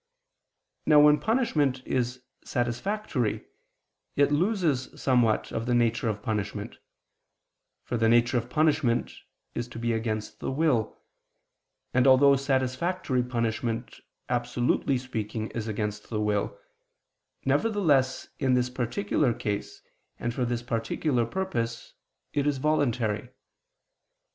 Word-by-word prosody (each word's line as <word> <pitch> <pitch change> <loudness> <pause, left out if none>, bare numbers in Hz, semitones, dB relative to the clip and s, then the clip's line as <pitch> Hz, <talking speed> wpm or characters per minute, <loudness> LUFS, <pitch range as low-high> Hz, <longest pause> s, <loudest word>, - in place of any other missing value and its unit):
Now 150 -1 +7
when 150 0 +6
punishment 150 - +1
is 125 0 -1 0.2
satisfactory, 125 - -1 0.7
it 145 0 +3
loses 160 - 0
somewhat 120 -5 +2
of 115 - -3
the 120 - +2
nature 115 -1 +2
of 105 -1 -4
punishment: 105 -1 -3 1.0
for 120 - -2
the 115 0 +3
nature 120 +1 +4
of 120 +1 -8
punishment 150 -5 +2 0.4
is 120 - -3
to 120 - -10
be 120 0 0
against 110 -1 -3
the - - -3
will; 135 -5 +1 1.0
and 130 +1 +4
although 140 +1 +7
satisfactory 135 +2 0
punishment, 115 -1 -2 0.3
absolutely 125 +2 +1
speaking, 110 -3 -4
is 115 -1 -4
against 105 -1 -3
the 110 - -2
will, 105 - 0 0.9
nevertheless 150 -12 +2
in 130 -1 +3
this 125 0 +1
particular 125 - 0
case 105 -1 -4 0.3
and 120 0 -3
for 125 0 -1
this 120 0 -2
particular 120 +2 0
purpose, 115 -10 -3 0.4
it 145 -1 +1
is 145 -2 +1
voluntary. 125 -6 0
125 Hz, 115 wpm, -27 LUFS, 115-140 Hz, 1.0 s, Now